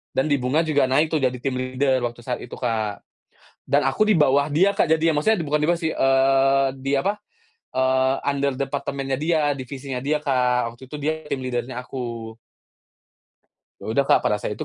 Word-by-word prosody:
Dan 145 Hz, +3 st, +1 dB
di 140 Hz, -, +3 dB
Bunga 135 Hz, +6 st, +1 dB
juga 145 Hz, -4 st, +2 dB
naik 150 Hz, +4 st, +2 dB
tuh, 155 Hz, -, +1 dB
jadi 130 Hz, -1 st, 0 dB
team 130 Hz, -2 st, -1 dB
leader 130 Hz, +1 st, 0 dB
waktu 120 Hz, 0 st, -11 dB
saat 125 Hz, 0 st, -3 dB
itu, 120 Hz, -, -9 dB
Kak. 110 Hz, -4 st, -2 dB, 0.6 s
Dan -, -, +2 dB
aku 135 Hz, +11 st, +2 dB
di 215 Hz, -, +2 dB
bawah 145 Hz, -2 st, +3 dB
dia, 190 Hz, +7 st, +3 dB
Kak, 155 Hz, -, +1 dB
jadinya. 160 Hz, -2 st, +2 dB
Maksudnya 220 Hz, -3 st, +3 dB
bukan 150 Hz, 0 st, 0 dB
dia 160 Hz, -, +2 dB
bawah 170 Hz, -, 0 dB
sih, 160 Hz, -1 st, 0 dB
eee, 135 Hz, 0 st, +3 dB
di 135 Hz, +1 st, -4 dB
apa, 200 Hz, +7 st, 0 dB, 0.6 s
eee, 130 Hz, 0 st, +2 dB
under 140 Hz, -1 st, 0 dB
departemennya 135 Hz, -1 st, -3 dB
dia, 160 Hz, 0 st, +2 dB
divisinya 130 Hz, -1 st, -6 dB
dia, 150 Hz, +2 st, 0 dB
Kak. 125 Hz, -5 st, 0 dB
Waktu 130 Hz, +2 st, -14 dB
itu 150 Hz, -, -6 dB
dia 150 Hz, +2 st, -1 dB, 0.2 s
team 130 Hz, -1 st, -3 dB
leader-nya 125 Hz, 0 st, -3 dB
aku. 115 Hz, -3 st, -6 dB, 1.5 s
Ya -, -, -9 dB
udah, 140 Hz, +5 st, +2 dB
Kak. -, -, +4 dB
Pada 105 Hz, -, +1 dB
saya 105 Hz, -, -4 dB
itu 105 Hz, -, -5 dB
135 Hz, 195 wpm, -23 LUFS, 130-150 Hz, 1.5 s, Kak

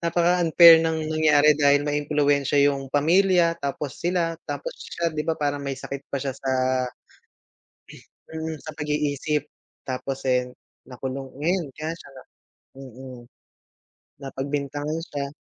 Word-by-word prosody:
napaka-unfair 170 Hz, -1 st, +6 dB
ng 160 Hz, -1 st, -1 dB
nangyari 150 Hz, -1 st, +5 dB
dahil 145 Hz, -1 st, +3 dB
maimpluwensya 145 Hz, -1 st, +1 dB
yung 140 Hz, -1 st, 0 dB
pamilya, 170 Hz, +4 st, +3 dB
tapos 140 Hz, 0 st, -4 dB
sila, 170 Hz, -1 st, 0 dB, 0.2 s
tapos -, -, -4 dB
siya, 170 Hz, -1 st, -3 dB
'di 150 Hz, -, -2 dB
ba 160 Hz, 0 st, -1 dB
parang 145 Hz, -1 st, -1 dB
may 140 Hz, -1 st, -4 dB
sakit 140 Hz, +1 st, -7 dB
pa -, -, -3 dB
siya 135 Hz, 0 st, -3 dB
sa 135 Hz, -1 st, -2 dB, 1.8 s
mm, 160 Hz, 0 st, -4 dB
sa 155 Hz, -, -7 dB
pag-iisip. 150 Hz, 0 st, -1 dB, 0.4 s
Tapos, 135 Hz, +1 st, -5 dB
eh, 125 Hz, 0 st, +2 dB, 0.4 s
nakulong, 130 Hz, +1 st, -6 dB
ngayon 175 Hz, +1 st, 0 dB
kaya 155 Hz, +1 st, -4 dB
siya -, -, -14 dB
na 130 Hz, -, -12 dB, 0.6 s
mm. 130 Hz, -1 st, -10 dB, 1.0 s
Napagbintangan 145 Hz, +3 st, -3 dB
siya. 140 Hz, -3 st, -5 dB
145 Hz, 125 wpm, -24 LUFS, 140-160 Hz, 1.8 s, napaka-unfair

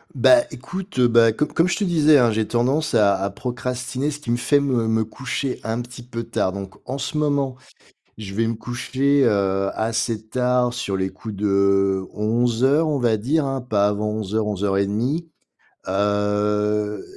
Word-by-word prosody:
Bah, 310 Hz, -1 st, +5 dB
écoute, 180 Hz, +6 st, -8 dB
heu, 125 Hz, -1 st, +5 dB
bah 115 Hz, -1 st, +5 dB
com 150 Hz, +7 st, 0 dB
comme 165 Hz, +4 st, +1 dB
je 185 Hz, -, -1 dB
te 210 Hz, -, -1 dB
disais 155 Hz, -5 st, +4 dB
hein, 120 Hz, -4 st, +4 dB
j'ai 110 Hz, 0 st, -1 dB
tendance 130 Hz, +5 st, 0 dB
à 100 Hz, -3 st, +4 dB
à 100 Hz, -, 0 dB
procrastiner 125 Hz, +4 st, -3 dB
ce 145 Hz, -, -5 dB
qui 125 Hz, -5 st, -4 dB
me 120 Hz, -, +2 dB
fait 145 Hz, +4 st, +2 dB
me 130 Hz, -5 st, 0 dB
me 110 Hz, 0 st, +1 dB
coucher 130 Hz, +3 st, -4 dB
un 110 Hz, +2 st, -2 dB
petit 120 Hz, +1 st, -11 dB
peu 120 Hz, -1 st, -6 dB
tard. 115 Hz, -4 st, -1 dB
Donc 100 Hz, 0 st, -7 dB, 0.2 s
en 135 Hz, -, -2 dB
ce 140 Hz, +3 st, -4 dB
moment, 140 Hz, -3 st, 0 dB, 0.6 s
je 100 Hz, -3 st, -7 dB
vais 115 Hz, +2 st, +1 dB
me 115 Hz, -, 0 dB
coucher, 130 Hz, +5 st, 0 dB
heu, 100 Hz, -2 st, +1 dB
assez 110 Hz, 0 st, -2 dB
tard, 125 Hz, 0 st, +1 dB
sur 100 Hz, -6 st, -3 dB
les 95 Hz, 0 st, 0 dB
coups 110 Hz, +2 st, -9 dB
de 100 Hz, -1 st, +2 dB
11:00 120 Hz, +8 st, +1 dB
on 150 Hz, -2 st, 0 dB
va 120 Hz, -3 st, +2 dB
dire 140 Hz, +8 st, 0 dB
hein, 135 Hz, -1 st, -3 dB
pas 105 Hz, -5 st, +1 dB
avant 105 Hz, +1 st, -1 dB
11:00-11:30. 105 Hz, -, -1 dB, 0.6 s
Heu, 105 Hz, +1 st, 0 dB
115 Hz, 175 wpm, -22 LUFS, 105-135 Hz, 0.6 s, Bah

